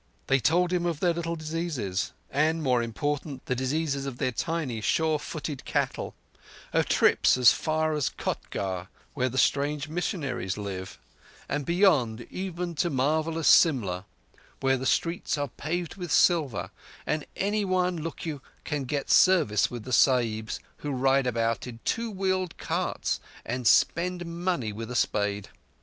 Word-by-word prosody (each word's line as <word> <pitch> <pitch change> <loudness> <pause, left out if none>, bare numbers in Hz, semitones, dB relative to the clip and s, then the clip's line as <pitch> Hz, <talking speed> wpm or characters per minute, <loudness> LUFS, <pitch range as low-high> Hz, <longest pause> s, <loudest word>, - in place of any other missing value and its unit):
They 135 0 +3
told 175 +8 +2
him 175 -1 +1
of 165 -4 -2
their 175 0 +2
little 170 0 -3
diseases, 155 - -3 0.2
and, 155 +3 +1
more 125 -3 +3
important, 140 +4 -3
the - - 0
diseases 140 +2 -1
of 130 -3 -5
their 130 - 0
tiny, 140 -4 -2
sure 160 +6 +1
footed 150 -2 -5
cattle; - - -2 0.6
of - - +2
trips - - +4
as 125 -2 +8
far 155 0 0
as 150 -3 0
Kotgarh, 95 -2 -4 0.3
where 130 -2 0
the 130 - -6
strange 145 +2 +1
missionaries 140 - -2
live, 95 -3 -5 0.5
and 145 -1 -2
beyond 150 - +3
even 180 -2 -4
to 175 - +1
marvellous 155 +4 0
Simla, 100 - +4 0.5
where 135 0 +2
the 130 0 -2
streets 170 -2 0
are 145 -1 -2
paved 170 +7 -4
with 175 -4 -5
silver, 155 - +3 0.3
and 150 -1 -1
anyone, 185 -3 +1
look 165 +1 -6
you, 150 -4 -4 0.2
can 145 -3 -2
get 140 +2 -2
service 165 - +5
with 120 -3 -6
the 130 - -5
Sahibs, 115 -5 +2 0.2
who 145 - -5
ride 135 0 +2
about 115 -1 0
in 115 -2 -8
two 230 0 0
wheeled 185 -3 -1
carts - - -2 0.3
and 125 0 -2
spend 175 +6 +3
money 170 - -2
with 115 +2 -6
a 125 - -5
spade. 105 -3 0
145 Hz, 150 wpm, -27 LUFS, 125-170 Hz, 0.6 s, as